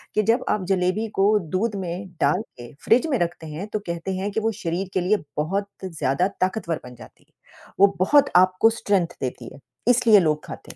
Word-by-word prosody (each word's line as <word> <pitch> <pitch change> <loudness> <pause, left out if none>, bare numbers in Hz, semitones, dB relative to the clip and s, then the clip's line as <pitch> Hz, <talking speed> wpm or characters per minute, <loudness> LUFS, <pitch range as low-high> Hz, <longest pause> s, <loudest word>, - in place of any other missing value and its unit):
कि 215 - +3
जब 225 +4 +2
आप 205 - 0
जलेबी 190 +3 +1
को 195 - +5 0.3
दूध 210 +3 0
में 180 +3 -5
डाल 150 +8 +2 0.2
के 120 -1 -11
फ्रिज 250 +8 +4
में 265 - +2
रखते 170 -1 -3
हैं, 155 +6 -6
तो 215 - -3
कहते 170 +2 -4
हैं 200 +2 -3
कि 210 - -1
वो 225 +1 0
शरीर 175 +3 -2
के 185 - +1
लिए 195 +4 +2 0.2
बहुत 195 +7 -1 0.2
ज़्यादा 165 -1 0
ताकतवर 185 -3 -1
बन 125 0 -11
जाती - - -16
है, - - -40 0.5
वो 200 0 +5
बहुत 280 +10 +4
आपको 185 +4 +5
स्ट्रेंथ 195 -4 +1
देती 125 -2 -5
है, - - -14 0.3
इसलिए 235 -4 +6
लोग 155 -2 0
खाते - - -10
185 Hz, 200 wpm, -23 LUFS, 170-210 Hz, 0.5 s, इसलिए